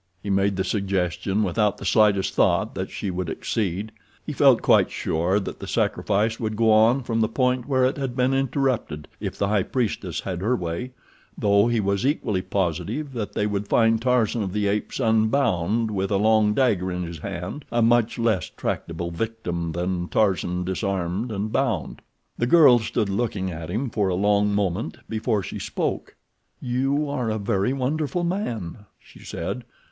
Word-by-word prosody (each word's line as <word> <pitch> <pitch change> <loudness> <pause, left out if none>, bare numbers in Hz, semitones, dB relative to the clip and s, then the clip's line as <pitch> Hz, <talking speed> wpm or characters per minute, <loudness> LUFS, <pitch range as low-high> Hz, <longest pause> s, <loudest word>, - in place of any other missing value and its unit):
He 100 - -2
made 100 0 +2
the 95 - 0
suggestion 95 0 -1
without 105 +2 +1
the - - -8
slightest 105 -3 +3
thought - - +2
that - - -4
she 100 - -4
would 90 -1 -3
accede. 100 +3 -2 0.3
He - - -4
felt - - +5
quite - - +4
sure 85 +5 0
that 95 - -6
the - - -7
sacrifice 110 +2 0
would 110 -2 -2
go 110 0 +3
on 115 +5 +4
from 115 -1 -1
the 110 - +3
point 125 +1 0
where 130 -2 +3
it 130 +3 0
had 135 -3 -3
been 130 +1 +2
interrupted 130 - -1
if - - -5
the 100 - 0
high 105 -1 +2
priestess 95 - -2
had 90 -2 -4
her 115 +6 +1
way, 90 +8 -4 0.4
though 100 +1 +3
he 120 -1 +1
was 100 -1 0
equally 110 -8 0
positive 95 - -2
that 110 -4 -4
they 105 - 0
would 105 -1 -2
find 115 0 +3
Tarzan 120 -2 +1
of 95 -3 -3
the 105 -1 0
Apes 105 +5 -2
unbound 110 -3 +2
and - - -5
with 95 -1 -1
a 100 - +2
long 105 0 +3
dagger 100 -9 +2
in 90 0 -3
his 85 -2 -7
hand 95 - -6
a 120 -1 +2
much 120 0 +3
less 115 -7 0
tractable 85 +1 -4
victim 85 -4 -3
than 90 +1 -2
Tarzan 90 -4 +1
disarmed 95 +3 -2
and 105 +1 -3
bound. - - -1 0.4
The 120 - +1
girl 140 -5 +7
stood 110 -1 -1
looking 100 -3 -1
at 80 -1 -7
him 115 +7 -2
for 105 -3 0
a 90 - 0
long 105 +2 +2
moment 100 0 -1
before 110 -2 -1
she - - -6
spoke. - - -3 0.4
"You 135 +4 0
are 130 -5 -2
a 110 - -1
very 100 +1 0
wonderful 145 +5 -1
man," 115 - -3
she - - -18
said. 120 +9 -5
105 Hz, 180 wpm, -24 LUFS, 95-120 Hz, 0.4 s, girl